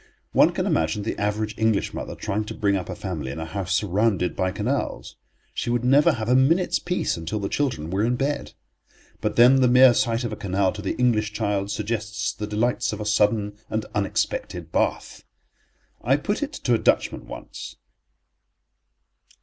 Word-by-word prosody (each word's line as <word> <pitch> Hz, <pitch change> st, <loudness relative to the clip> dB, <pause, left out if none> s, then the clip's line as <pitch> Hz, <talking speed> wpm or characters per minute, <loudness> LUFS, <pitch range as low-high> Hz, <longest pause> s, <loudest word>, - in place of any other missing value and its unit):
One -, -, +5 dB
can -, -, -2 dB
imagine 80 Hz, +6 st, 0 dB
the 110 Hz, -, -2 dB
average 105 Hz, +1 st, -1 dB
English 110 Hz, -2 st, +1 dB
mother -, -, -5 dB
trying 105 Hz, +2 st, -2 dB
to -, -, -7 dB
bring 100 Hz, -2 st, +1 dB
up 90 Hz, -3 st, -4 dB
a -, -, -4 dB
family 80 Hz, -9 st, -5 dB
in 70 Hz, -, -7 dB
a 80 Hz, -, -4 dB
house 95 Hz, +2 st, -4 dB
surrounded 100 Hz, -2 st, +1 dB
by 95 Hz, -, 0 dB
canals. 120 Hz, +8 st, -3 dB, 0.4 s
She -, -, -3 dB
would 120 Hz, 0 st, 0 dB
never 145 Hz, +6 st, +5 dB
have 110 Hz, -4 st, -4 dB
a 125 Hz, -, +3 dB
minute's 155 Hz, +8 st, +3 dB
peace 180 Hz, -, -1 dB
until 80 Hz, +5 st, -4 dB
the 100 Hz, -2 st, -2 dB
children 95 Hz, -, -2 dB
were 95 Hz, +2 st, 0 dB
in 120 Hz, +2 st, +1 dB
bed. 140 Hz, +3 st, -2 dB, 0.7 s
But -, -, -2 dB
then 125 Hz, +3 st, +7 dB
the 125 Hz, -, +5 dB
mere 125 Hz, 0 st, +7 dB
sight 120 Hz, -1 st, 0 dB
of 115 Hz, -2 st, -3 dB
a -, -, -3 dB
canal 95 Hz, -1 st, 0 dB
to 105 Hz, -, -7 dB
the 100 Hz, -, -2 dB
English 110 Hz, -4 st, +1 dB
child 100 Hz, -2 st, -1 dB
suggests 110 Hz, +1 st, -2 dB
the 105 Hz, -, -5 dB
delights 120 Hz, +3 st, 0 dB
of 105 Hz, -, -5 dB
a 105 Hz, -, -4 dB
sudden 105 Hz, 0 st, +1 dB
and 110 Hz, 0 st, -2 dB
unexpected 100 Hz, -1 st, -2 dB
bath. -, -, -1 dB, 0.8 s
I 135 Hz, +4 st, +3 dB
put 205 Hz, -, -2 dB
it 290 Hz, +1 st, -3 dB
to 125 Hz, -, 0 dB
a 115 Hz, -, +3 dB
Dutchman -, -, +1 dB
once. -, -, -9 dB
110 Hz, 185 wpm, -24 LUFS, 100-125 Hz, 0.8 s, then